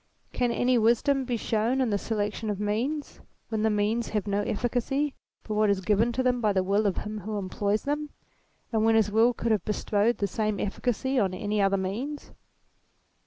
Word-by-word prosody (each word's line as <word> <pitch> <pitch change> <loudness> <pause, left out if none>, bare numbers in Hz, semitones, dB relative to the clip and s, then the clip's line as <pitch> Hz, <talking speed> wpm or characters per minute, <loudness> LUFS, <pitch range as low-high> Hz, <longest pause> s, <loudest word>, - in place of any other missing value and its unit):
Can 245 -1 +1
any 245 +1 +2
wisdom 250 +5 +2
be 245 -2 -1
shown 225 +4 0
in 250 -4 +1
the 205 - +2
selection 210 0 -2
of 205 -2 -2
means, 235 +9 -2 0.3
when 220 -1 -1
the 220 - +3
means 215 +3 0
have 210 -2 -1
no 200 0 0
efficacy 250 +7 -1 0.3
but 215 - -4
what 210 0 +3
is 200 -1 +2
given 210 +4 +2
them 250 0 +1
by 210 -2 +2
the 190 -1 +2
will 200 +3 +2
of 190 - -1
him 215 0 -4
who 210 +2 -4
employs 200 +2 -1
them, 295 +1 -2 0.6
and 220 -1 +2
when 225 0 +4
his 215 -2 +3
will 225 +3 +5
could 235 -1 -2
have 210 -5 +2
bestowed 210 +2 +1
the 200 - 0
same 210 +1 -1
efficacy 250 +5 -1
on 190 -4 +1
any 205 +2 -1
other 195 0 +3
means 230 +11 -4
220 Hz, 195 wpm, -27 LUFS, 205-245 Hz, 0.6 s, will